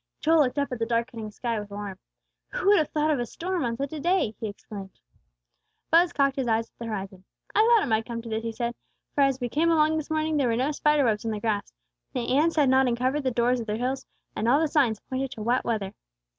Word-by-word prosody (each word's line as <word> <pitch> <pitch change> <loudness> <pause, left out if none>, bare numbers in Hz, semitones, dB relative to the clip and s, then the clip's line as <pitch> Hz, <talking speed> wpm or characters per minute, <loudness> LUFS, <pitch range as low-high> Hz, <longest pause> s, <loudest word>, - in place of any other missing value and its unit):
Joel 320 +1 +4
looked 275 -2 +2
up 280 -1 0
at 250 - -4
the 225 - +1
darkening 230 -1 -2
sky 230 +1 -3
with 205 0 -8
alarm. 200 -2 -6 0.5
"Who - - +1
would 415 - +6
have 305 - +1
thought 305 0 +1
of 290 - +1
a 240 - -1
storm 355 +5 -3
on 230 -1 -2
such 280 +2 -3
a 310 - -4
day!" 345 - +1
he 220 - -3
exclaimed. 200 -2 -9 0.9
Buz 340 +2 +5
cocked 275 -4 +1
his 260 -2 -1
eyes 225 0 0
at - - -52
the 235 - -5
horizon. 195 -3 -5 0.3
"I - - +2
thought 460 -1 +5
it - - -2
might 220 -1 +1
come 235 -1 -4
to 230 - -8
this," 220 0 -2
he 230 0 -3
said; 235 +1 -3 0.4
"for 290 - +1
as 275 -1 +3
we 245 - -1
came 315 +7 +1
along 315 -1 +3
this 310 0 -4
morning 315 0 0
there 275 -3 +2
were 230 - +1
no 260 +5 +1
spider 300 0 +2
webs 215 -3 +1
on 225 - -2
the 215 -1 -2
grass; 210 -2 -1 0.4
the 250 -1 -1
ants 320 +4 +3
had 295 -3 +4
not 260 0 +4
uncovered 255 +4 0
the 265 - 0
doors 245 +1 +1
of 230 - -6
their 210 0 -1
hills; 255 +3 -2 0.3
and 220 - -1
all 270 +5 +5
the 320 - +2
signs 265 -8 +2
pointed 265 +1 -3
to 220 -5 -7
wet 245 +3 +1
weather. 210 -5 -2
250 Hz, 260 wpm, -26 LUFS, 225-300 Hz, 0.9 s, would